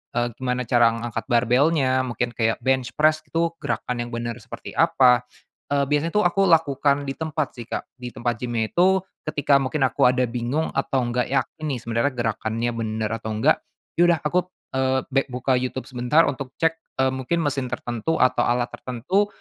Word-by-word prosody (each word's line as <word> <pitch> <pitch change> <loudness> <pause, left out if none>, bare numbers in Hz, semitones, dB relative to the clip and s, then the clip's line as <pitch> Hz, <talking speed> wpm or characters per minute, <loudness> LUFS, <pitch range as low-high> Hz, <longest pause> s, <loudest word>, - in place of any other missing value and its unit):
eee, 120 0 0
gimana 125 -1 -1
cara 120 -1 +4
ngangkat 115 -1 -4
barbelnya, 130 +2 +3
mungkin 120 0 -2
kayak 115 -1 0
bench 130 -2 +1
press 155 +1 +3
itu 165 0 0
gerakan 125 -1 -3
yang 120 0 -4
bener 120 0 -3
seperti 105 - -9
apa, 125 -2 +4 0.5
eee, 140 -1 +3
biasanya 150 +3 +1
tuh 210 - +4
aku 195 +2 +2
lakukan 145 -4 +3
di 135 - -3
tempat 155 -2 -3
sih, 120 -2 -8
Kak. - - -5
Di 125 -1 -6
tempat 120 -1 -2
gimnya 115 -3 -2
itu 190 +1 +3 0.2
ketika 145 -2 +3
mungkin 135 +2 -1
aku - - +1
ada 125 0 +2
bingung 125 +6 -1
atau 135 -2 0
nggak 120 +1 -1
yakin 140 +3 -2
nih 130 - -2
sebenernya 115 +5 0
gerakannya 115 0 -1
bener 110 -1 -2
atau 110 - -5
nggak, 135 +9 +3 0.4
ya - - +7
udah 170 -2 +3
aku, 155 +4 +2 0.4
eee, 130 0 +2
bek 135 +1 +1
buka 130 +1 0
YouTube 130 +1 -4
sebentar 125 +6 +3
untuk 135 -2 -4
cek, 165 0 +2 0.3
eee, 130 - +2
mungkin 130 +6 -1
mesin 140 -3 -1
tertentu 120 +6 -2
atau 130 - +3
alat 120 0 +1
tertentu, 145 - -1
130 Hz, 180 wpm, -23 LUFS, 120-145 Hz, 0.5 s, ya